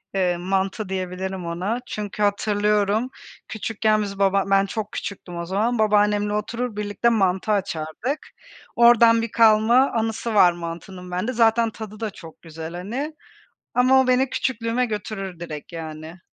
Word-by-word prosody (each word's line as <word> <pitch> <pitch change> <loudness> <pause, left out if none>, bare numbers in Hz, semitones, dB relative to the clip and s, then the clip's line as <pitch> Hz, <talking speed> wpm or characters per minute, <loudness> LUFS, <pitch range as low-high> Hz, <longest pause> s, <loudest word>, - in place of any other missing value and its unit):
Eee, 180 -2 +1
mantı 190 +2 -2
diyebilirim 185 -1 -4
ona 185 +8 -2
çünkü 210 0 -4
hatırlıyorum, 210 +2 +1 0.4
küçükken 215 0 0
biz, 200 -1 -6
baba 195 0 +3
ben 195 0 +4
çok 215 +1 -5
küçüktüm 180 -3 -6
o 170 - -4
zaman, 220 +6 0
babaannemle 210 -1 +2
oturur, 230 +2 -3
birlikte 210 +3 0
mantı 195 -2 +1
açardık. 195 - -2 0.5
Oradan 235 -1 +6
bir 230 - -4
kalma 230 +4 +5
anısı 225 0 -2
var 180 -3 +7
mantının 175 +2 -8
bende, 185 +8 -2
zaten 230 0 +3
tadı 215 -1 -9
da 220 -2 -2
çok 165 -5 -13
güzel, 160 0 -8
hani. 250 - -4 0.6
Ama 255 +1 +5
o 260 - +1
beni 255 +1 +3
küçüklüğüme 240 0 -1
götürür 195 -4 -5
direkt 155 -1 -7
yani. 160 +1 -8
205 Hz, 145 wpm, -23 LUFS, 185-230 Hz, 0.6 s, var